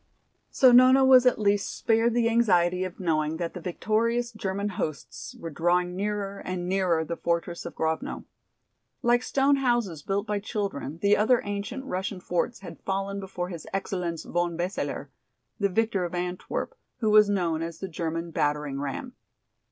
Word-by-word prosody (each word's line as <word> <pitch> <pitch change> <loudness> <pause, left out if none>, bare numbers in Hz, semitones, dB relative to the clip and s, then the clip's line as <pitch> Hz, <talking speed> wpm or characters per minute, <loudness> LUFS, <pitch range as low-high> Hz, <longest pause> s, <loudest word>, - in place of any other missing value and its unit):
So 260 -2 +5
Nona 255 +2 +7
was 255 -1 +7
at 250 - +4
least 205 -1 0
spared 230 +1 +2
the 235 -1 +3
anxiety 185 -6 +3
of 185 -1 -6
knowing 160 -3 0
that 170 -1 -3
the 180 - -7
victorious 230 +7 0
German 200 -1 -3
hosts 155 -6 -5
were 165 - -7
drawing 175 +3 +1
nearer 200 0 -3
and 180 -1 -4
nearer 180 -4 +1
the 170 - -3
fortress 170 0 -2
of - - -9
Grovno. 160 0 -2 0.8
Like 240 0 +4
stone 275 +2 +2
houses 240 - 0
built 200 +5 -1
by 210 -2 -1
children 195 - -4
the 200 +1 +5
other 235 +3 +3
ancient 205 +6 -4
Russian 190 -3 -3
forts 180 +6 -2
had 190 - -10
fallen 195 +1 -2
before 185 -2 -5
his 170 -4 -8
"Excellenz 180 -4 -3
von 175 -1 -1
Beseler," 180 +3 -3 0.5
the 200 -1 +2
victor 210 -1 +1
of 175 0 -4
Antwerp, 180 - -3 0.2
who 220 -4 +1
was 210 -1 +7
known 170 -5 0
as 165 0 -5
the 190 - -5
German 165 0 -4
battering 145 -2 -1
ram. 145 - -4
190 Hz, 165 wpm, -27 LUFS, 170-220 Hz, 0.8 s, Nona